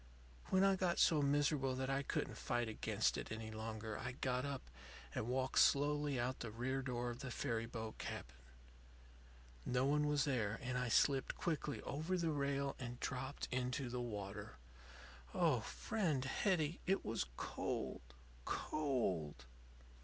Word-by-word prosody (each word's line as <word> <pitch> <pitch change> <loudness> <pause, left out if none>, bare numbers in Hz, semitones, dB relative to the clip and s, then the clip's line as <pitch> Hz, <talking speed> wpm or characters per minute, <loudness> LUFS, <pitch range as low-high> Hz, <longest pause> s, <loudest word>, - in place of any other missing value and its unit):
"When 190 0 +5
I 195 -1 +5
got 180 -2 +1
so 155 -3 +5
miserable 145 -2 +2
that 130 +1 -1
I 135 0 +2
couldn't 135 -3 -2
fight 120 -1 0
against 110 - +1
it - - -6
any 110 0 -4
longer, 110 0 -4
I 125 -1 -3
got 125 0 0
up 140 -2 -3 0.5
and 110 - -2
walked 130 +1 +2
slowly 145 -1 +4
out 125 +2 -1
the 115 - -4
rear 130 +5 -1
door 125 -2 -2
of 120 - -7
the 135 -2 -4
ferry 115 -2 -1
boat 110 -2 -5
cabin. 65 - -5 1.3
No 125 - +2
one 150 +1 +3
was 145 -1 +3
there, 115 -6 0
and 125 0 -2
I 125 -1 0
slipped 135 +3 +3
quickly 150 -3 -1
over 160 +6 -1
the 165 -2 +1
rail 140 -1 0
and 120 -1 -5
dropped 130 +2 -3
into 125 0 -1
the 125 0 -2
water. 105 -2 -5 0.8
Oh, - - +4
friend 165 -12 -1
Hetty, 165 +2 +1
it 195 +1 +2
was 115 - -1
cold, - - -2 0.4
cold! 95 - -1
130 Hz, 155 wpm, -39 LUFS, 120-145 Hz, 1.3 s, When